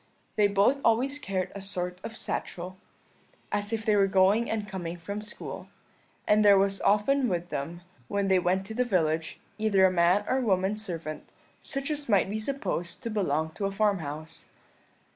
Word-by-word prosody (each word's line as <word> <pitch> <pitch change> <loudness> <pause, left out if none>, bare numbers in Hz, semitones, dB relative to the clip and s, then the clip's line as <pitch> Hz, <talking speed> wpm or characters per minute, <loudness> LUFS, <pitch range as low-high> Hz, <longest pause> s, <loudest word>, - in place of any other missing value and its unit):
They 210 -1 +4
both 205 +8 +3
always 255 +5 +2
carried 190 -8 -2
a 200 - -7
sort 180 -2 -4
of 225 - -6
satchel, 185 +2 -4 0.7
as 205 0 -1
if 225 -1 -2
they 215 -2 +4
were 200 -1 +4
going 195 +4 +3
and 215 -2 -2
coming 175 -3 -5
from 200 +5 -5
school; 210 +1 -8 0.6
and 215 0 +5
there 200 -1 +7
was 195 0 +1
often 245 +6 +3
with 175 -1 -2
them, 165 +5 -4 0.3
when 200 -1 0
they 190 -1 +4
went 185 +2 +1
to 220 - -7
the 250 +3 +1
village, 165 -8 0 0.2
either 200 -3 +4
a 185 - +4
man 180 +3 +3
or 260 +1 +1
woman 195 -3 +1
servant, 170 -7 -5 0.3
such 275 +2 -3
as 290 -3 -3
might 195 -2 +3
be 215 - -2
supposed 215 -7 -3
to 230 - -3
belong 160 -7 0
to 200 - -4
a - - -3
farmhouse. 165 -6 -2
200 Hz, 180 wpm, -28 LUFS, 180-215 Hz, 0.7 s, there